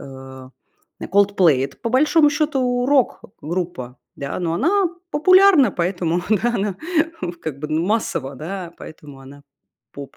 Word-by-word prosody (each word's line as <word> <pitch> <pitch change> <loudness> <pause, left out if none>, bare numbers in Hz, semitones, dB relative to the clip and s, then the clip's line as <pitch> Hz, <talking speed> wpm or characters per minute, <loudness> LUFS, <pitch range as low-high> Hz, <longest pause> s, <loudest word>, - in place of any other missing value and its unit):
м, 130 -1 -11 0.5
"Coldplay". 190 -9 +3
Это 140 - -8
по 230 - -1
большому 300 +3 +4
счёту 260 -5 0
рок-группа, 175 - -2 0.2
да, 140 +4 -5
но 170 -2 -2
она 360 - +1 0.2
популярна, 370 - +5
поэтому 175 -1 -1
да 235 +3 +1
она 200 -2 -2 0.7
как 145 -4 -5
бы 150 - -5
ну 155 +2 0
массово, 165 -11 -2
да, 175 +3 -6
поэтому 145 -3 -12
она 140 +2 -14 0.5
поп. 140 -1 -10
180 Hz, 130 wpm, -20 LUFS, -, 0.7 s, популярна